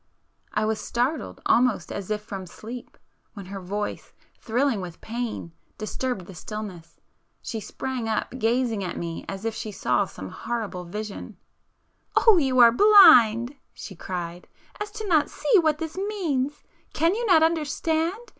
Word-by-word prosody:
I 210 +1 0
was 220 0 0
startled 250 +7 -2
almost 245 -2 +2
as 200 -1 -5
if 210 0 -2
from 195 -3 -7
sleep 230 +7 -9 0.4
when 200 -2 -8
her 195 +1 -7
voice, 205 +3 -4 0.3
thrilling 240 -1 0
with 175 -2 -8
pain, 230 -6 -5 0.3
disturbed 215 -2 -3
the 190 - -11
stillness,—she 195 +2 -9
sprang 245 +2 -4
up, 220 - -1
gazing 230 -2 +1
at 180 - -4
me 165 -1 -5
as 195 +2 -6
if 225 - -1
she 215 0 -5
saw 125 -10 +1
some 95 - -9
horrible 220 -6 -4
vision. 210 +3 -7 0.8
"Oh, 445 -5 +6
are - - +5
you 265 -4 +2
so 235 -1 +9
blind," 255 - +7 0.2
she 195 - -9
cried, 175 0 -6 0.3
"as 415 0 -4
not 320 -6 +3
to - - -16
see 440 -6 +3
what 310 -3 +2
this 320 0 -5
means? 335 -9 -2 0.3
Can 330 +3 +3
you 465 +3 -2
not 320 -5 +6
understand? 320 +1 0
230 Hz, 155 wpm, -25 LUFS, 200-300 Hz, 0.8 s, so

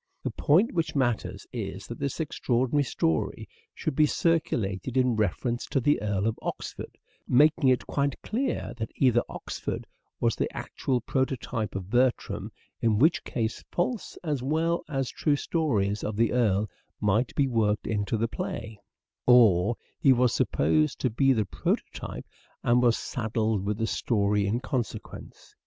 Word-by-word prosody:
The - - -2
point 180 +10 +3
which 165 -4 -1
matters 120 -5 -1
is - - -5
that - - -8
this 140 +2 -3
extraordinary 130 -2 +1
story 80 - -1 0.3
should 155 - -3
be 155 +1 +5
circulated 130 - 0
in 125 -2 +3
reference 110 +4 -1
to 135 - +1
the 145 +4 +2
Earl 100 -1 0
of 115 0 -1
Oxford; - - -6 0.3
making 145 +2 +5
it 125 -2 +2
quite 140 -1 -1
clear 255 +5 -2
that 110 -1 -3
either 120 -3 +4
Oxford - - -5 0.3
was 115 -2 +2
the - - -1
actual 125 -2 -2
prototype 125 -4 -2
of 95 0 -5
Bertram, 125 +1 +1 0.3
in 110 -2 +3
which 155 +9 +3
case 115 -6 -3
false 200 +5 -2
as 150 -6 -1
well 160 +5 +1
as 135 -3 -1
true 150 -2 +1
stoiies 110 - 0
of 105 - -2
the 115 +1 +2
Earl 110 -4 +2 0.3
might 105 +3 +1
be 140 - +3
worked 110 -4 +1
into 105 0 -1
the 115 +2 +1
play, 110 -2 -5 0.5
or 115 -4 +6 0.2
he 135 - +6
was 125 -1 +3
supposed 75 +1 +1
to 130 - +1
be 135 +4 +3
the 110 -5 +2
prototype - - -3 0.4
and 120 +1 +4
was 120 -2 +4
saddled 110 -3 -1
with 105 +1 -1
the 115 - 0
story 105 -3 +1
in 115 +5 0
consequence. 125 -4 -5
120 Hz, 155 wpm, -27 LUFS, 105-135 Hz, 0.5 s, or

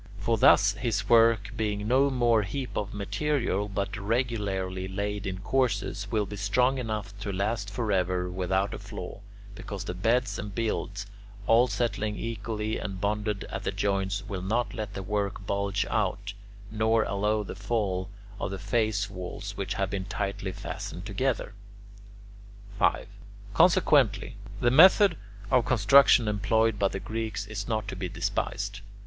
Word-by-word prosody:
For 105 +4 +1
thus 105 -1 +6
his 105 -2 -2
work, 115 -3 +5
being 105 -1 -2
no 135 +4 +4
mere 120 -4 +3
heap 120 +7 -4
of 105 -1 -2
material 105 0 -1
but 100 0 -2
regularly 100 -4 -1
laid 100 +1 -3
in 95 -1 -3
courses, 110 -4 0
will 105 -1 +1
be 105 - -7
strong 125 +6 +2
enough 105 -4 -4
to 100 0 -4
last 100 +2 -1
forever 95 -5 0
without 95 +3 -1
a - - -6
flaw, 100 -3 -8 0.3
because 100 -1 -6
the - - -4
beds 115 +7 +1
and 100 -1 -6
builds, 105 -3 -2 0.4
all 115 +3 +5
settling 110 -4 -1
equally 110 -1 -3
and 95 -3 -5
bonded 105 0 -1
at - - -4
the - - -1
joints, 100 0 -1
will 95 -2 -4
not 115 +6 -1
let 105 -2 -5
the 95 - -4
work 100 0 -2
bulge 100 +1 0
out, 100 -1 -1 0.4
nor 110 +1 +2
allow 105 +2 0
the - - -7
fall 100 -3 -2 0.3
of - - -2
the 95 - -4
face 105 0 0
walls 90 -3 -7
which - - -3
have 95 -1 -1
been 95 -2 -3
tightly 100 -1 -3
fastened 90 0 -6
together. 110 +2 -1 1.3
5. - - +2 0.5
Consequently, - - +4 0.3
the 120 - +3
method 185 - +7 0.4
of 130 -2 +5
construction 125 +1 +6
employed 105 +1 +1
by 100 - +3
the 95 - -4
Greeks 110 -3 -4
is 100 -1 -5
not 110 -2 -1
to - - -5
be 90 -1 -4
despised. 100 +3 -2
105 Hz, 155 wpm, -28 LUFS, 100-115 Hz, 1.3 s, method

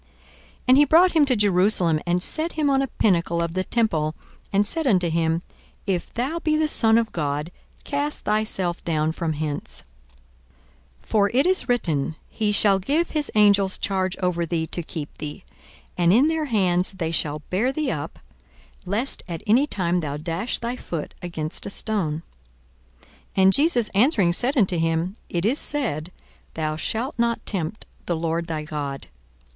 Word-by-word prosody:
42:004:009 - - -33 0.6
And 255 - +7
he 295 - +7
brought 340 +6 +5
him 315 -3 +4
to 260 -3 +2
Jerusalem, 185 -5 +3
and 175 +1 +1
set 325 +2 -1
him 300 -3 +1
on 270 0 +3
a 270 - 0
pinnacle 170 -7 +1
of 170 -1 -1
the 185 +1 0
temple, 160 -10 0 0.4
and 200 +1 +3
said 320 +7 0
unto 180 -7 +3
him, 165 +1 0 0.4
If 185 -4 -2
thou 275 +8 -2
be 310 -2 +1
the 310 0 +2
Son 225 -6 +4
of 230 -1 0
God, 150 0 -2 0.3
cast 290 +1 -2
thyself 200 -5 -1
down 155 -1 0
from 160 -1 -2
hence: 145 - -4 1.2
42:004:010 - - -25
For 205 -2 +3
it 270 - +4
is 370 -6 +1
written, 160 - 0 0.2
He 215 -2 0
shall 205 -1 +4
give 295 - 0
his 300 -2 -1
angels 200 -2 +4
charge 190 -2 -1
over 175 -1 +1
thee, 165 -1 -1
to 175 - -5
keep 155 -2 -7
thee: 150 +5 -6 0.4
42:004:011 - - -29
And 175 +1 +4
in 255 +7 +5
their 320 -1 0
hands 185 -7 +1
they 165 -4 -3
shall 150 -2 -1
bear 220 +8 +1
thee 300 0 -1
up, - - -5 0.7
lest 225 +8 -1
at 170 -3 -6
any 245 +7 +4
time 180 -7 0
thou 145 -3 -3
dash 165 +9 -2
thy 235 +1 -3
foot 165 -9 -5
against 160 -1 -4
a - - -3
stone. 180 -7 -1 0.8
42:004:012 - - -25 0.3
And 190 0 +6
Jesus 275 - +3
answering 200 - +3
said 255 - -1
unto 185 -6 +2
him, 165 +3 0
It 175 +1 -1
is 255 +7 +2
said, 185 - -1 0.4
Thou 155 -1 -2
shalt 225 - -2
not 235 0 0
tempt 190 +1 -3 0.2
the 175 - 0
Lord 165 +1 -2
thy 155 -2 -3
God. 145 -3 -5
190 Hz, 175 wpm, -23 LUFS, 165-240 Hz, 1.2 s, And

